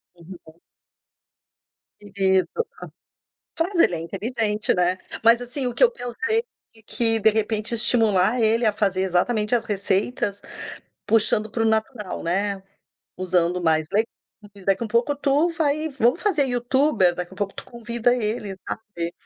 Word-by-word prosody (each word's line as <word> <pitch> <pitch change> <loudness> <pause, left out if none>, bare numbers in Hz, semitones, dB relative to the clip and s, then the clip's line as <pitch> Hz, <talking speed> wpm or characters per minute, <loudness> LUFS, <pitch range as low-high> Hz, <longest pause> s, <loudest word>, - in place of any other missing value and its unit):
Uhum. 170 -1 -14 1.4
Querido. 190 -2 +1 1.1
Mas 360 +4 0
ele - - +4
é - - -5
inteligente, 210 +4 0
né, 180 +1 +1 0.3
mas 230 +1 +6
assim, 250 +2 -3
o 245 - -3
que - - -1
eu 480 - +5
pensei 450 - -2 0.4
que 225 0 +1
de 220 +1 +5
repente 215 +1 -1
estimular 225 -1 +3
ele 225 +2 +2
a 215 - +3
fazer 195 -3 0
exatamente 210 +5 +1
as 230 -1 +1
receitas, 200 +1 -1 0.7
puxando 215 0 +2
para 225 - -2
o - - +1
natural, 220 -1 -2
né, 195 +3 -1 0.6
usando 180 -1 0
mais 160 -2 +1
legumes, 205 -2 -5
daqui 195 +4 +1
um - - -4
pouco 235 +6 +1
tu 290 +4 +1
vai 310 -1 0
vamo 250 -2 +2
fazer 345 -9 +1
Youtube, 245 -5 +2
daqui 180 +1 -6
um - - -14
pouco 200 -1 -3
tu - - -9
convida 235 +1 -1
ele, 215 -3 -2
sabe. 175 -6 -5
215 Hz, 145 wpm, -23 LUFS, 190-245 Hz, 1.4 s, mas